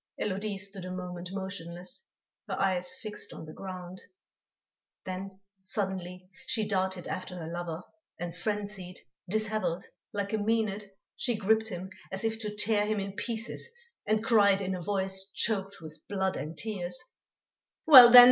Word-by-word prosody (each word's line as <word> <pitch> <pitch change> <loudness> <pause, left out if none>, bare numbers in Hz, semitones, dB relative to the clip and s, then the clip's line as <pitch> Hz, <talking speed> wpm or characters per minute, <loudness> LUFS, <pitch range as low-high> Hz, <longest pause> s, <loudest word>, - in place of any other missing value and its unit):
Élodie 200 +1 -1
stood 195 -1 -5
a 185 - -5
moment 180 -1 -5
motionless, 190 - -5 0.4
her - - -3
eyes 185 +3 +1
fixed 215 -5 -6
on - - -8
the 155 - -9
ground. 185 -1 -7 1.0
Then, 190 +1 -5 0.2
suddenly, 185 -2 -3 0.2
she 220 -2 +1
darted 190 -3 0
after 185 0 -4
her 165 - -5
lover, 170 0 -4 0.4
and 175 -1 -4
frenzied, 200 -1 -3 0.3
dishevelled, 215 -4 0 0.3
like 200 0 -2
a - - +3
Mænad, 210 -1 0 0.3
she 240 -1 +1
gripped 220 +2 +2
him 185 -1 -5 0.2
as 190 +2 -3
if 225 0 0
to 210 -2 -4
tear 210 0 +2
him 215 -1 +1
in 195 0 -3
pieces 230 - -3 0.4
and 215 +1 +2
cried 205 -5 +5
in 190 -1 -1
a 180 - -3
voice 190 +1 -1
choked 200 -3 0
with 155 -1 -9
blood 190 -2 0
and 155 +3 -5
tears: 210 0 -1 0.9
"Well, 260 -7 +12
then! 245 +1 +13
195 Hz, 150 wpm, -30 LUFS, 185-215 Hz, 1.0 s, then